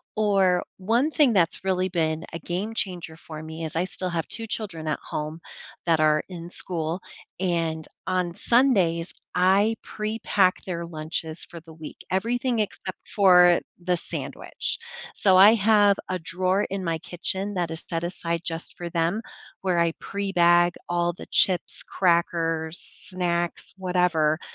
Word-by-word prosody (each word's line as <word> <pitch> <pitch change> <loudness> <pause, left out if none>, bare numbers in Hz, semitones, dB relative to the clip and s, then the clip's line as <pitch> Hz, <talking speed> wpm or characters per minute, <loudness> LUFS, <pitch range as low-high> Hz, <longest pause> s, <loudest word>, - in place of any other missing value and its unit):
or 195 -4 +3
one 235 +10 +1
thing 295 -5 +4
that's 175 -4 +2
really 185 -1 +1
been 160 -2 -1
a 165 - -4
game-changer 180 -2 -3
for 155 -1 -9
me 160 +1 -6
is 155 - -6
I 165 - +2
still 185 -1 -1
have 170 -2 -2
2 225 -1 -6
children 180 -8 -4
at 150 - -1
home 155 +2 -5 0.5
that 165 -2 +3
are 155 0 +3
in 170 -2 -7
school, 170 -1 -3 0.4
and 165 -4 -1 0.2
on 180 -2 0
Sundays, 185 -8 +2 0.2
I 195 +5 +4
pre-pack 215 -3 0
their 170 -2 -3
lunches 160 0 -4
for 170 - -10
the 160 0 -14
week, 155 -1 -9
everything 235 +5 0
except 195 -2 -4
for 180 -3 +6 0.2
the 180 0 +2
sandwich, - - -4 0.4
so 190 -2 +5
I 200 +4 +9
have 205 -1 +4
a 185 - 0
drawer 185 +4 0
in 195 0 -3
my 165 -2 0
kitchen 190 +5 -3
that 175 -3 -1
is 160 - -4
set 165 -1 -1
aside 170 -1 -2
just 165 -1 -5
for 175 -1 -5
them, 170 +5 0 0.4
where 185 -2 +1
I 170 -1 +2
pre-bag 175 -3 +3 0.2
all 175 0 +1
the - - -11
chips, 185 -2 +2
crackers, 165 -2 +1
snacks, 175 -2 -3
whatever, 180 -4 +2
175 Hz, 150 wpm, -25 LUFS, 165-195 Hz, 0.5 s, I